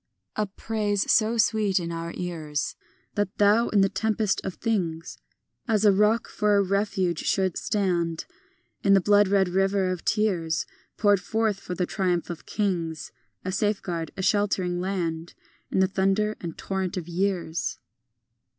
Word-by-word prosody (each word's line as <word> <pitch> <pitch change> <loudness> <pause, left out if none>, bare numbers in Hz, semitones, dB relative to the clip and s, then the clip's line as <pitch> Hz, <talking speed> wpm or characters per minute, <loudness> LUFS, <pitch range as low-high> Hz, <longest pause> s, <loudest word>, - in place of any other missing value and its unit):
III 215 - +1
A - - -1
praise 205 0 -1
so 225 +1 +3
sweet 210 -3 +2
in 170 -1 -4
our 165 0 -4
ears, 155 -4 -3 0.4
That 205 -1 -2
thou 210 +3 +4
in 205 - +3
the 195 - +5
tempest 210 0 0
of 190 - -4
things 175 -8 -2 0.5
As 215 -2 +2
a 205 - +8
rock 210 +3 +2
for 210 -1 +1
a 200 - +4
refuge 195 -3 0
shouldst 190 -3 0
stand, 175 -5 0 0.6
In 200 -2 +5
the - - +6
bloodred 200 -1 +4
river 195 0 +2
of 180 -2 -4
tears 180 -7 0 0.3
Poured 205 -2 +3
forth 220 0 0
for 180 -2 -6
the 180 - 0
triumph 180 -3 -1
of 170 - -9
kings; 175 -6 -2 0.3
A 185 - -1
safeguard, 185 -5 -1
a 190 - -3
sheltering 190 -3 +1
land, 170 -3 -3 0.3
In 190 - +1
the 190 - +4
thunder 195 +3 +1
and 170 -2 -6
torrent 190 -1 -3
of 175 -2 -4
years. 175 -2 -1
195 Hz, 155 wpm, -26 LUFS, 175-205 Hz, 0.6 s, a